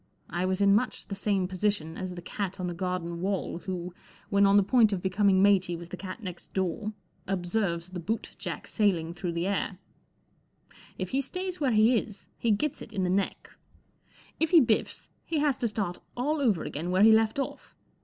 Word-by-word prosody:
I 175 +1 0
was 190 +1 0
in 200 0 +6
much 215 +5 0
the 200 - -3
same 195 -2 0
position 185 -4 -1
as 185 -1 -5
the 175 - -8
cat 195 +1 -4
on 185 - -2
the 175 - -2
garden 175 -1 -3
wall 190 -2 -2
who* 180 -1 -5 0.4
when 200 0 +5
on 200 +1 +5
the 200 - +6
point 220 +1 +4
of 195 - 0
becoming 190 +1 +3
matey 185 -3 +4
with 170 0 -9
the - - -5
cat 185 +4 -8
next 180 -3 -8
door, 190 +4 -1 0.3
observes 180 -2 -1
the 180 - -5
boot 220 +7 -3
jack - - -5
sailing 175 -6 +1
through 175 0 -4
the 170 +1 -1
air* 195 -1 -1 1.2
If 185 -1 -3
he 270 - +1
stays 365 +6 -4
where 280 -4 +2
he 220 +2 +5
is* 205 -2 -9
he 235 - 0
gets 245 +8 0
it - - -9
in 195 -3 -1
the 180 - +1
neck; 195 +1 -1 0.9
if 320 - +2
he 340 - +8
biffs, 230 -6 +1
he 325 - -2
has 290 -3 +2
to 235 - +1
start 200 -5 -3 0.2
all 290 +4 0
over 215 - +2
again 165 +5 -4
where 185 +2 +4
he 220 - +8
left 220 +1 +4
off. 275 - -5
195 Hz, 205 wpm, -28 LUFS, 180-220 Hz, 1.2 s, he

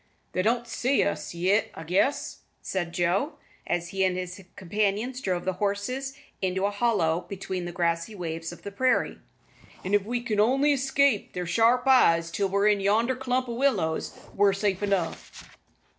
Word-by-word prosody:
"They 185 - 0
don't 235 +4 +1
see 255 +4 +1
us 200 - -3
yit, 185 +5 +2
I 160 - -7
guess," 190 - 0 0.2
said 175 -3 -2
Joe, 180 - 0 0.3
as 175 0 -1
he 195 +1 0
and 185 -1 +1
his 185 +1 -6
companions 210 +6 -1
drove 180 -5 -2
the 190 - 0
horses 250 +7 -2 0.2
into 190 0 0
a 205 - +1
hollow 200 -7 +1
between 190 -2 -4
the 175 - -4
grassy 170 +3 -1
waves 165 -2 -4
of 175 - -12
the 200 - -6
prairie, 255 +6 +1 0.7
"an' 190 - -2
if 205 -1 +4
we 240 +3 -3
only 265 +7 +3
can - - +5
escape 270 -3 +1
their 180 0 -3
sharp 230 +7 +3
eyes 170 -11 +4
till 195 +2 0
we're 200 +2 +2
in 210 -1 +4
yonder 220 +6 +2
clump 255 0 -1
o' 235 - -4
willows, 215 -12 0 0.2
we're 200 0 +4
safe 195 -1 -1
enough." 195 -5 -2
200 Hz, 175 wpm, -27 LUFS, 180-240 Hz, 0.7 s, can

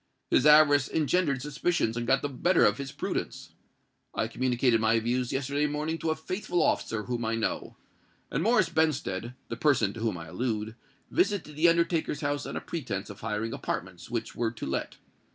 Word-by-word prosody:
His 140 - +5
avarice 145 -2 +6
engendered 150 -4 +1
suspicions 150 -5 0
and 120 0 -3
got 135 +1 +3
the - - +1
better 165 +7 +3
of 105 +4 +2
his 140 -1 -5
prudence. - - -4 0.6
I 110 - 0
communicated 120 -1 +1
my 115 +1 +3
views 120 +2 -1
yesterday 140 +2 0
morning 155 +2 -2
to 165 - -1
a 155 - +1
faithful 180 +3 -1
officer 110 -2 0
whom 120 0 -3
I 115 0 0
know; 115 - -3 0.5
and - - 0
Morris 220 -2 +3
Benstead—the 125 -7 -1
person 130 - +2
to - - -8
whom 110 -5 -1
I 80 -1 -8
allude—visited 120 - -2
the 165 +3 +5
undertaker's 170 -2 +1
house 145 0 -1
on - - -6
a - - -4
pretence 110 - -4
of 100 - -12
hiring 115 +1 -3
apartments 90 -1 -5
which 115 -1 -3
were 115 -1 0
to 110 - -7
let. 65 - -3
130 Hz, 175 wpm, -28 LUFS, 115-155 Hz, 0.6 s, avarice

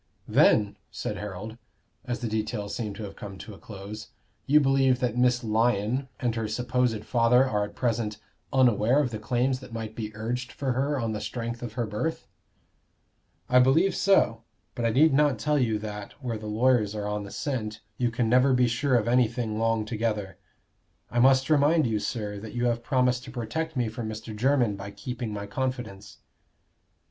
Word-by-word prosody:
"Then," 105 -2 +4
said - - -4
Harold, 105 +3 -7 0.5
as 120 0 -3
the 120 - -1
details 110 -1 -3
seemed 105 -2 -4
to 110 - -7
have 100 -1 -7
come 100 -2 -8
to 105 - -9
a - - -13
close, 105 +1 -8 0.4
"you 150 +2 +6
believe 135 -2 +3
that 120 -2 -1
Miss 125 0 +2
Lyon 115 +3 +1
and 120 -2 0
her 115 -1 -2
supposed 120 0 0
father 125 +2 +4
are 105 -4 0
at 105 0 -12
present 115 -3 -1 0.3
unaware 125 -2 +4
of 135 -5 0
the 110 - -4
claims 125 +4 0
that 130 -2 -12
might 110 -1 -5
be 110 -2 -4
urged 120 +3 -3
for 135 -2 -2
her 135 +3 0
on 115 -2 -1
the 105 - -4
strength 120 -1 -4
of 120 - -6
her 120 -2 -1
birth?" 110 +10 -3 1.2
"I 125 +2 +5
believe 150 +10 +4
so. 120 - +3 0.3
But 120 -2 -3
I - - +3
need 140 +6 +4
not 145 -3 +3
tell 145 +7 +1
you 115 -4 +1
that 105 -1 -7
where 120 -6 -5
the 110 - -7
lawyers 110 -1 +2
are 105 -1 -3
on 105 0 -2
the 100 - -8
scent 110 -4 -4 0.2
you 120 -1 +2
can 115 0 0
never 125 +3 +4
be 125 -1 +4
sure 125 +3 +1
of 115 -2 +2
anything 120 -2 +1
long 115 -1 +1
together. 105 -3 -2 0.7
I 120 - 0
must 130 +1 +5
remind 155 +1 +4
you, 110 -3 0
sir, 105 -3 -3
that 110 +3 -9
you 120 0 0
have 120 -1 +1
promised 125 -1 +1
to 130 - -9
protect 130 +7 -3
me 120 -2 +1
from 110 0 -5
Mr. 110 0 -7
Jermyn 120 -2 +2
by 100 0 -7
keeping 120 +2 -5
my 100 -1 -4
confidence." 110 -4 -4
115 Hz, 190 wpm, -27 LUFS, 110-125 Hz, 1.2 s, you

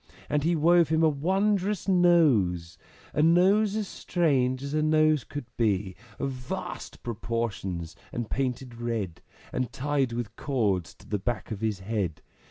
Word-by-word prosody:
And 150 -1 +2
he 170 +2 +2
wove 170 +1 +4
him 160 0 +2
a 160 - +6
wondrous 190 +6 0
Nose, 145 - +3 0.4
A 150 - +2
Nose 190 +6 +4
as 215 -2 -1
strange 135 -9 0
as 140 +1 -4
a 155 - +2
Nose 155 -2 +3
could 145 -3 -6
be! 100 -4 +1 0.2
Of 140 - -2
vast 125 -1 -6
proportions 105 -7 -3 0.2
and 120 -2 -3
painted 125 -2 -3
red, 110 -8 -3 0.3
And 125 -2 -1
tied 140 -1 0
with 115 -2 -4
cords 105 - -1
to - - -18
the 105 - -1
back 115 0 -3
of 105 -1 -4
his 105 -4 -1
head. 95 -6 -2
130 Hz, 155 wpm, -27 LUFS, 110-160 Hz, 0.4 s, a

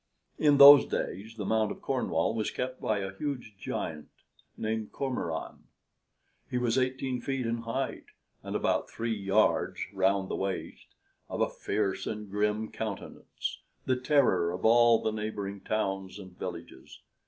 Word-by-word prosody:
In 145 -2 +5
those 140 0 +10
days 110 +5 -4
the 105 - -4
Mount 110 0 +2
of - - -9
Cornwall 80 +6 0
was 110 -2 -1
kept 130 0 -4
by 110 -4 0
a 95 0 -5
huge 130 -6 -4
giant 75 -2 -4 0.5
named 110 -1 -3
Cormoran. 125 - -4 0.8
He 125 - -1
was 120 -1 +1
eighteen 130 -1 -1
feet 135 -1 -2
in 115 +1 -1
height, 115 +4 -3 0.4
and - - -6
about - - 0
three 115 0 -2
yards 100 +1 +1
round 95 0 +2
the - - -3
waist, 95 -1 -4 0.4
of - - -4
a - - +2
fierce 100 -2 -2
and 105 -2 -5
grim 105 +1 0
countenance, 110 -3 -5 0.3
the 130 - +2
terror 125 - +2
of 90 +3 -4
all 120 0 +6
the 110 - +1
neighboring 105 -2 -4
towns 95 -2 -2
and 95 -3 -11
villages. 85 -2 -8
110 Hz, 150 wpm, -29 LUFS, 95-125 Hz, 0.8 s, those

